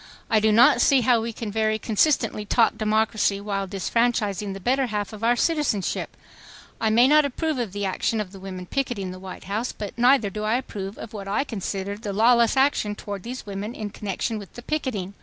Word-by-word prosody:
I 220 - +5
do 215 0 +3
not 230 +4 +6
see 275 -3 +5
how 240 -1 +3
we 230 +1 -3
can 220 -1 -6
very 215 0 +1
consistently 225 0 +1
talk 225 +2 +2
democracy 215 -1 +1
while 200 -1 -3
disfranchising 205 0 0
the - - -7
better 260 +6 +1
half 210 -2 -3
of 215 +1 -9
our 240 +1 +4
citizenship—I 240 - -3
may 235 +4 +5
not 300 +2 +6
approve 290 +1 -2
of 230 -5 -2
the 205 +1 -3
action 195 +4 -1
of 205 -3 -4
the 195 - -11
women 185 -1 -7
picketing 215 -5 -2
the 185 - -9
White 185 -1 -9
House, 215 +5 -2
but 205 - -7
neither 245 -4 +4
do 210 +2 -5
I 215 +2 +1
approve 200 -5 -6
of 225 - -9
what 200 -2 -7
I 205 +7 +1
consider 200 -5 -4
the 210 -3 -4
lawless 235 +4 +4
action 265 -6 +2
toward 200 -2 -6
these 250 +5 -7
women 205 +3 -5
in 210 -1 -5
connection 210 +2 -3
with 200 - -12
the 240 - -10
picketing 245 -12 -3
215 Hz, 205 wpm, -24 LUFS, 200-240 Hz, -, not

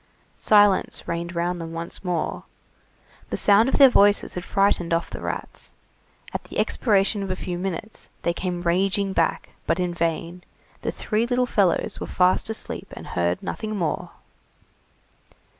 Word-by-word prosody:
Silence 205 -2 +3
reigned 170 +1 -3
round 175 +1 -1
them 165 0 -6
once 165 +3 -5
more, 175 -3 -2 0.9
the - - -2
sound 210 +4 +5
of - - +1
their 275 - +9
voices 205 -4 +4
had 180 - -5
frightened 195 -4 +1
off 170 - -3
the - - -7
rats; - - -6 0.6
at - - -3
the - - -8
expiration 205 -2 +2
of 195 - -4
a 185 - -1
few 180 -1 -5
minutes, 190 +4 -5
they 170 - +1
came 175 0 -3
raging 190 +3 +1
back, 165 -3 0 0.2
but 165 +3 +1
in 180 -1 -1
vain, 170 +1 -2 0.4
the - - -2
three 220 +2 -1
little 250 0 +1
fellows 200 -7 +1
were - - -5
fast 185 +3 +2
asleep 220 - -2
and - - -9
heard 85 0 -1
nothing 215 -1 -4
more. 170 -6 -2
185 Hz, 160 wpm, -24 LUFS, 170-205 Hz, 0.9 s, their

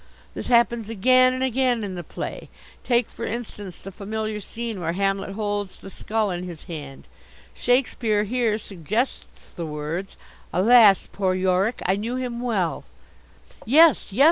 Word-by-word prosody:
This - - -6
happens 235 -2 +3
again 255 +4 +4
and 255 0 -2
again 255 -2 +1
in 195 -2 -4
the 175 - -5
play. - - -6 0.3
Take, 240 -2 +2
for - - -9
instance, 210 -6 -5
the 195 - -9
familiar 215 +2 -4
scene 225 0 -5
where 165 0 -1
Hamlet 195 +1 -1
holds 205 -2 -3
the 195 - -11
skull 215 +1 -1
in 175 0 -4
his 170 -3 -9
hand: 145 -5 -8 0.5
Shakespeare 240 -4 +1
here 225 0 0
suggests 210 - -4
the 170 -2 -6
words 155 +5 -5 0.3
'Alas, 210 +1 +6
poor 190 -2 0
Yorick! 190 +5 +1
I 190 +2 +2
knew 230 +4 -3
him 245 -2 -3
well 205 -9 -1 0.4
'" - - -24
"Yes, 300 0 +5
yes!" 205 - -5
210 Hz, 155 wpm, -24 LUFS, 190-240 Hz, 0.5 s, Alas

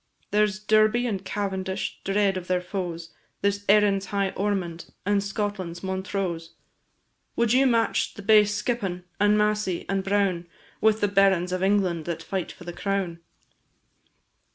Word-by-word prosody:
There 210 +1 +4
's 195 -2 -5
Derby 215 +3 +3
and 200 -5 -2
Cavendish, 190 -1 -3
dread 195 0 +1
of 185 -1 -5
their 185 0 +1
foes; 175 -3 -5 0.3
There 200 - +4
's 200 0 -7
Erin's 200 -2 +4
high 200 -1 0
Ormond, 185 -4 -2 0.2
and 200 0 +2
Scotland's 200 -4 -4
Montrose! 190 -3 -3 0.8
Would 235 -1 +2
you 265 +1 +5
match 230 -2 +1
the 205 - -9
base 210 0 +5
Skippon, 195 -7 -2 0.2
and 205 +1 +4
Massey, 210 -4 0
and 195 -1 -1
Brown, 195 -3 0 0.3
With 220 0 +3
the 205 - +3
barons 195 -3 +3
of 185 0 -2
England 190 -5 +1
that 170 -2 -4
fight 190 -3 -3
for - - -13
the 175 0 -7
crown? 190 -3 -2
195 Hz, 155 wpm, -25 LUFS, 185-210 Hz, 0.8 s, you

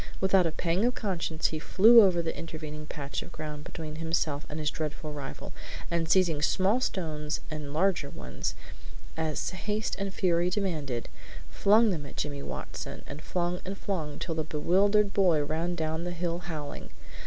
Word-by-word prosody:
Without 190 -2 +4
a - - -1
pang 170 +5 0
of 245 +1 +2
conscience 170 -6 0
he 155 - -3
flew 225 +8 +8
over 180 -4 +4
the 160 - -2
intervening 155 -2 -6
patch 140 -3 -4
of - - -10
ground 150 -1 -6
between 155 -1 -6
himself 160 -2 -1
and 150 - -5
his 150 -1 0
dreaded 155 -2 -3
rival, 150 -3 -6 0.4
and 165 -1 0
seizing 170 -5 +4
small 195 +9 +3
stones 155 -8 -2
and 150 -2 -5
larger 165 -2 +2
ones, - - -4 0.6
as 160 -2 -1
haste 210 +3 -2
and 195 0 -2
fury 175 -2 +2
demanded, 155 - -2 0.4
flung 215 +2 +5
them 150 -6 -3
at - - -12
Jimmy 145 -1 -2
Watson, - - -6
and 145 +1 -7
flung 175 +1 -1
and 195 +1 -5
flung, 160 -9 -3
till 170 - -3
the 160 -1 -1
bewildered 195 +7 +3
boy 175 -7 +4
ran 165 +4 -1
down 160 0 -1
the 175 - -2
hill 175 0 -2
howling. 160 -4 -6
165 Hz, 170 wpm, -29 LUFS, 150-190 Hz, 0.6 s, flew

